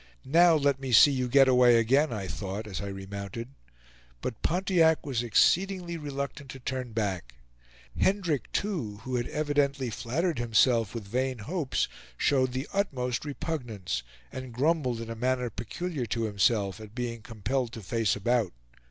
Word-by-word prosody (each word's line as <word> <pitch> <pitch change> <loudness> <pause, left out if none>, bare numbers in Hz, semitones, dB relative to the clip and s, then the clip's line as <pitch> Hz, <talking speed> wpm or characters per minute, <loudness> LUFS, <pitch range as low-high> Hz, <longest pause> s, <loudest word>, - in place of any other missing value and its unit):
"Now 165 +5 +6
let 140 -3 +2
me 135 -1 -4
see 125 +5 +8
you 130 -2 0
get 135 +1 +6
away 125 -2 +6
again!" 135 +6 +3
I 105 -4 -3
thought, 100 +2 -5
as 95 -3 -5
I 100 - -4
remounted. 100 +4 -6 0.7
But 115 - -4
Pontiac 175 -2 +2
was 130 -5 -1
exceedingly 175 - +2
reluctant 140 -2 -5
to 135 - -8
turn 125 -1 -4
back; 95 - -3 0.6
Hendrick, 180 - +1
too, 130 - -2
who 130 0 -3
had 120 - -2
evidently 145 -4 0
flattered 150 - -1
himself 115 -1 +3
with 110 -4 -5
vain 130 +4 -1
hopes, 145 - -1 0.3
showed 130 -3 +2
the 130 +3 -3
utmost 130 -11 -1
repugnance, 125 - -3 0.3
and 130 -1 -7
grumbled 130 -3 +1
in 115 0 -6
a - - -4
manner 125 0 0
peculiar 140 - -4
to 115 +1 -1
himself 100 -1 +1
at 110 +1 -11
being 120 -2 -3
compelled 115 +3 -2
to 115 - -7
face 115 +2 +1
about. 115 -1 +1
125 Hz, 155 wpm, -28 LUFS, 110-145 Hz, 0.7 s, see